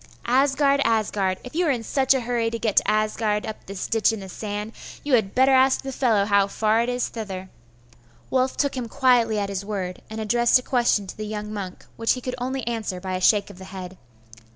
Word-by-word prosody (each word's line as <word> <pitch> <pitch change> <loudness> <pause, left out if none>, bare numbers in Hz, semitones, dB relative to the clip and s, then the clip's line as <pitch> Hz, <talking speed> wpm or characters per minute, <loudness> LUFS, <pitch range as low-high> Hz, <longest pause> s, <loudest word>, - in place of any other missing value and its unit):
'Asgard 275 +2 +3
Asgard! 200 -4 +1
If 250 - -10
you 345 +2 +1
are - - +2
in 245 -5 0
such 270 +3 +2
a 265 - 0
hurry 235 -1 0
to 230 - -3
get 220 -3 -1
to - - +4
Asgard 215 0 0
up 220 - -7
this 195 -1 -5
ditch 225 0 +2
in 220 - -4
the 190 - -9
sand, 210 +2 -5 0.3
you 290 - -2
had 215 -5 +2
better 265 +1 +5
ask 265 +1 +4
the 270 - -4
fellow 230 -6 +2
how 200 -1 +3
far 220 +2 +1
it 235 - -1
is 245 0 -1
thither.' 190 -4 -7 0.8
Wulf 260 0 +1
took 280 -2 0
him 250 -2 -3
quietly 245 -5 +3
at 200 -1 -1
his 195 0 -3
word, 190 -3 -4
and 220 0 -6
addressed 235 +3 +3
a 255 - -5
question 240 -6 +2
to 190 - -8
the 215 0 -5
young 210 0 -5
monk, 190 -3 -6
which 230 0 +2
he 255 - -6
could 255 0 -4
only 260 0 -3
answer 225 -6 -3
by 185 0 -5
a 185 - -2
shake 205 +1 +3
of 185 - -15
the 190 - -9
head. 185 -1 -8
220 Hz, 230 wpm, -24 LUFS, 200-250 Hz, 0.8 s, better